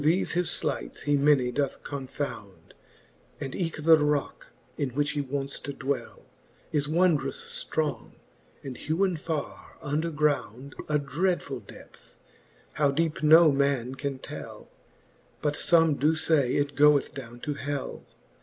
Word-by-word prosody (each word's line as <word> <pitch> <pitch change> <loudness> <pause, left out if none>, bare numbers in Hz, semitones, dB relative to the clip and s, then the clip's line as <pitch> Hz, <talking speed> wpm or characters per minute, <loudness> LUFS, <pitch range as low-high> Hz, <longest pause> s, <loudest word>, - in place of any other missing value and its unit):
Through 155 +3 +4
thefe 185 - -1
his 175 0 +1
flights - - -3
he 145 0 +2
many 140 -3 +3
doth 140 +1 -2
confound, 135 -7 -6 0.7
And 135 - -5
eke 165 -4 -3
the 160 0 +7
rocke, 150 -1 -1 0.2
in 140 - -1
which 145 +1 +1
he 145 -1 -1
wonts 140 0 -4
to 140 - -6
dwell, 135 0 -4 0.5
Is 145 -1 0
wondrous 185 - 0
fl:rong, 150 -8 -2 0.5
and 130 -3 -6
hewen 180 +3 0
farre 155 -1 -5
under 150 +3 -1
ground 140 -4 -1 0.2
A 150 - +3
dreadfull 165 +6 -1
depth, - - -15 0.6
how 145 -1 +2
deepe 155 +3 0
no 160 +1 +7
man 135 -3 +1
can 135 0 -4
tell - - -8
j - - -25 0.8
But 150 -1 +1
fbme 165 -1 +3
doe 155 +3 +3
fay, 150 -5 +2
it 145 0 0
goeth 145 0 +4
downe 120 -3 -9
to 150 - -2
hell. 145 0 -4
145 Hz, 145 wpm, -27 LUFS, 140-160 Hz, 0.8 s, the